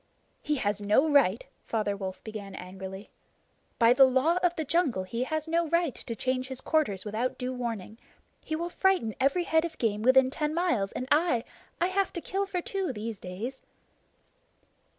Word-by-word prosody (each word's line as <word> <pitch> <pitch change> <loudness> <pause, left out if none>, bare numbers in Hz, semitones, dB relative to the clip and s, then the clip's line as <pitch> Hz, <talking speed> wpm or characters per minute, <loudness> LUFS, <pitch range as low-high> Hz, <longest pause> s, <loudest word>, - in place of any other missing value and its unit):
"He 300 - 0
has 205 -5 -1
no 210 +9 +3
right!" 275 -9 +3 0.2
Father 210 -3 0
Wolf 190 -2 -6
began 205 -3 -7
angrily 190 +2 -8 0.7
"By 230 0 +6
the 270 +1 +8
Law 265 +7 +3
of 355 -1 +1
the 315 - -2
Jungle 280 - +1
he 235 +7 -3
has 315 +2 -2
no 335 +1 +1
right 335 -3 +1
to 230 - -6
change 255 +3 -1
his 260 -1 -5
quarters 275 - 0
without 220 +4 -2
due 255 +1 -3
warning. 230 -3 -5 0.4
He 315 - -3
will 340 +2 -3
frighten 370 - +2
every 280 +7 +2
head 320 -1 +2
of 335 -1 -5
game 210 -3 0
within 260 +2 +5
ten 300 +2 -2
miles, 335 - +1
and 255 - -4
I 300 -7 +3 0.4
I 345 - +3
have 380 +1 0
to - - -3
kill 390 +3 -2
for 365 -2 -2
two, 385 -6 -2
these 220 -2 -5
days." 210 +9 -6
255 Hz, 180 wpm, -28 LUFS, 215-320 Hz, 0.7 s, the